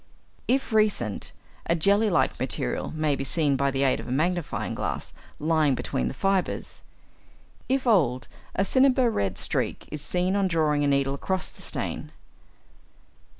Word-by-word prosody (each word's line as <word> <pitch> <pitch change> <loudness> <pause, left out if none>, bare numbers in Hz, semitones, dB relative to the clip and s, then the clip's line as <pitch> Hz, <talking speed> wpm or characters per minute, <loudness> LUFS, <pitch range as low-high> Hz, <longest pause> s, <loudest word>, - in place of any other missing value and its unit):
If 260 -2 +1
recent, 205 - +1 0.4
a 170 - +3
jelly 200 +6 +3
like 175 - +1
material 60 - -2
may 155 -2 +1
be 135 - -3
seen 145 0 +2
by 140 +1 +1
the 135 0 0
aid 135 - +2
of - - -8
a - - -5
magnifying 170 +4 -1
glass - - -3 0.2
lying 155 -3 +2
between 65 - -2
the - - -4
fibres. 195 -1 -1 0.9
If 265 0 +1
old, 135 - +2 0.3
a 195 - +2
cinnabar 260 0 +4
red 100 - -1
streak - - -2
is 150 -1 -5
seen 180 +5 0
on 200 -1 +2
drawing 155 -4 +1
a - - +2
needle 140 -1 +2
across 185 +6 -2
the - - -15
stain. - - -3
160 Hz, 155 wpm, -26 LUFS, 140-195 Hz, 0.9 s, cinnabar